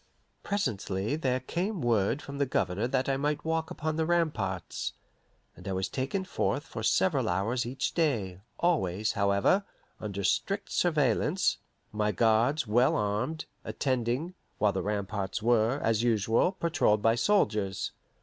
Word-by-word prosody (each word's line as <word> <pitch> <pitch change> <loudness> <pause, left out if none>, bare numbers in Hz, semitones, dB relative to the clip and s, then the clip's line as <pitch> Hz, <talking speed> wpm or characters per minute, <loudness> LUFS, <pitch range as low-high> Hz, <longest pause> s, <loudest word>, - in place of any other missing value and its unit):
Presently 110 - -1
there 130 -5 0
came 180 - -2
word 120 +1 +1
from 140 0 -7
the 140 - +2
Governor 105 -2 0
that 130 0 0
I 135 -1 +1
might 150 +2 -1
walk 160 0 -1
upon 155 0 -3
the 160 - +1
ramparts, 120 - -1 0.6
and 90 - -11
I 95 - -1
was 95 0 -1
taken 140 +9 -2
forth - - -1
for - - -7
several - - +2
hours 115 +7 0
each 130 +1 -2
day; 110 - 0 0.2
always, 110 - +1
however, 100 - +2 0.4
under 100 -2 -4
strict 195 - 0
surveillance, 155 - +2 0.3
my 105 0 0
guards, 115 - +2
well 120 +4 +3
armed, 110 +10 -1 0.2
attending, 130 +5 -1 0.2
while 105 -2 +2
the - - -1
ramparts 100 -1 -3
were, 120 +3 +3
as 115 -1 +2
usual, 115 - +2
patrolled 165 - +1
by 115 - +5
soldiers. 110 - +1
120 Hz, 140 wpm, -29 LUFS, 105-155 Hz, 0.6 s, by